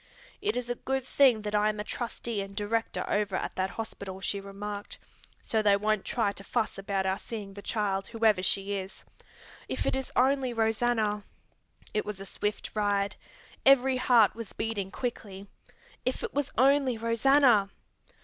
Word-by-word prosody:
"It 415 +1 0
is 250 -1 -2
a 245 - 0
good 265 +1 -2
thing 255 -5 +4
that 210 0 -4
I 210 0 +3
am 210 0 -3
a - - -1
trustee 235 -1 -4
and 195 0 -8
director 225 +2 -1
over 205 -2 0
at - - -2
that 190 0 -1
hospital," 195 -2 -6
she 200 +1 -2
remarked, 205 +1 -7 0.5
"so 220 - +1
they 205 -1 +5
won't 215 0 0
try 225 -5 +1
to 195 - -7
fuss 220 -1 -1
about 195 -1 -1
our 190 +1 0
seeing 205 -4 -7
the 200 - -9
child, 200 -3 -1
whoever 220 -4 +2
she 195 +2 +1
is. 190 -1 -6 0.6
If - - -2
it - - +1
is 265 -1 -3
only 260 -1 +3
Rosanna 225 -1 +1 0.4
" - - -26
It 210 - +1
was 210 -2 -6
a 195 - -7
swift 205 +1 -3
ride. 205 -1 +1 0.5
Every 265 -1 +5
heart 240 -5 +5
was 230 -3 -8
beating 215 -4 -3
quickly. 200 -4 -5 0.6
If - - -2
it 465 - -4
was 285 -1 -1
only 265 -1 +4
Rosanna! 230 -1 +4
215 Hz, 175 wpm, -29 LUFS, 200-240 Hz, 0.6 s, they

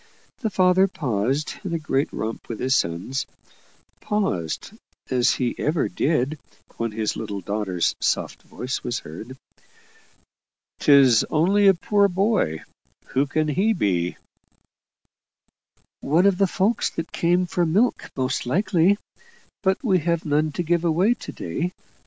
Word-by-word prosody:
The 220 - -1
father 190 0 +4
paused 135 - -2
in 180 -4 -3
a - - +1
great 145 -3 -1
romp 110 +1 -5
with 115 - -5
his 130 +1 +2
sons 90 +9 -1 0.7
paused, 100 - -2 0.4
as 125 -2 +3
he 125 -2 -1
ever 150 -5 +1
did 145 - 0 0.4
when 115 -1 -2
his 110 0 -2
little 105 -2 -4
daughter's 95 -2 -1
soft - - -1
voice 130 +2 -5
was 120 - -2
heard. 110 +12 -9 1.4
"'Tis 135 -6 +6
only 195 +6 +3
a 195 - +6
poor 200 +3 +2
boy 190 - 0 0.5
who 135 +2 +1
can 155 +2 0
he 200 +9 +2
be?" 90 - 0 1.8
"One 165 +7 +2
of 200 -2 +3
the 195 - +4
folk 200 +5 0
that 165 - -4
come 175 +2 +2
for 175 0 -1
milk 195 +10 +1
most 130 -1 -1
likely 190 - +2 0.6
but 190 +4 0
we 190 -7 +3
have 170 +1 -1
none 150 +1 +1
to 175 - -2
give 170 +1 +1
away 175 +7 +3
to - - -9
day. 165 - -4
155 Hz, 140 wpm, -23 LUFS, 120-185 Hz, 1.8 s, Tis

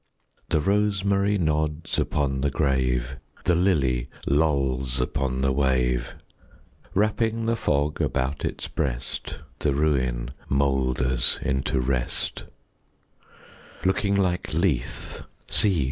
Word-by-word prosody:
The 80 - +2
rosemary 100 +2 +2
nods 80 -2 0
upon 70 -2 0
the 70 - +2
grave; 65 -3 0 0.3
The 90 - +3
lily 70 -9 +2 0.2
lolls 70 -4 +1
upon 65 0 -1
the 65 0 +2
wave; 65 -2 +1 0.8
Wrapping 110 +2 +1
the 115 +1 +2
fog 75 -7 0
about 65 +3 -1
its - - -3
breast, - - -3 0.2
The 70 -2 +1
ruin 65 -5 +1 0.2
moulders 65 -2 +1
into 65 0 0
rest; 65 -1 0 1.4
Looking 100 +1 +2
like 90 -2 0
Lethe, 80 -8 -1 0.3
see! 95 -5 +3
70 Hz, 100 wpm, -25 LUFS, 65-90 Hz, 1.4 s, The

